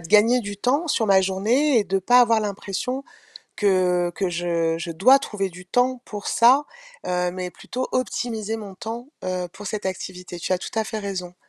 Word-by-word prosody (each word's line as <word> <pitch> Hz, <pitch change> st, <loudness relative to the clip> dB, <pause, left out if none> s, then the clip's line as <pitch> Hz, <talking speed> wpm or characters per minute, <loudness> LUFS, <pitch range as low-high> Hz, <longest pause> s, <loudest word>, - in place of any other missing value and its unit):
de 165 Hz, -, -11 dB
gagner 225 Hz, +4 st, +5 dB
du 205 Hz, -2 st, -6 dB
temps 275 Hz, -, 0 dB
sur 225 Hz, -6 st, +1 dB
ma 195 Hz, -2 st, +5 dB
journée 225 Hz, +9 st, +2 dB
et 210 Hz, -, +1 dB
de 195 Hz, 0 st, 0 dB
pas 245 Hz, +6 st, +5 dB
avoir 230 Hz, -2 st, +4 dB
l'impression 210 Hz, +6 st, -3 dB, 0.5 s
que 180 Hz, -3 st, +2 dB
que 190 Hz, -3 st, -1 dB
je 170 Hz, -1 st, 0 dB
je 170 Hz, 0 st, -5 dB
dois 255 Hz, +12 st, +6 dB
trouver 195 Hz, -7 st, -3 dB
du 180 Hz, +1 st, -12 dB
temps 250 Hz, +5 st, +1 dB
pour 205 Hz, -1 st, -6 dB
ça, 255 Hz, +5 st, +5 dB, 0.4 s
heu, 180 Hz, 0 st, 0 dB
mais 180 Hz, 0 st, -4 dB
plutôt 255 Hz, +7 st, -5 dB
optimiser 225 Hz, -3 st, -2 dB
mon 205 Hz, -3 st, -8 dB
temps, 235 Hz, +4 st, -6 dB, 0.2 s
heu, 180 Hz, -1 st, -2 dB
pour 205 Hz, +2 st, -10 dB
cette 210 Hz, +1 st, -4 dB
activité. 180 Hz, -1 st, -5 dB
Tu 175 Hz, -, -2 dB
as 185 Hz, -, +2 dB
tout -, -, -7 dB
à 220 Hz, -, +1 dB
fait 220 Hz, 0 st, -4 dB
raison. 185 Hz, -3 st, -5 dB
200 Hz, 200 wpm, -23 LUFS, 180-235 Hz, 0.5 s, dois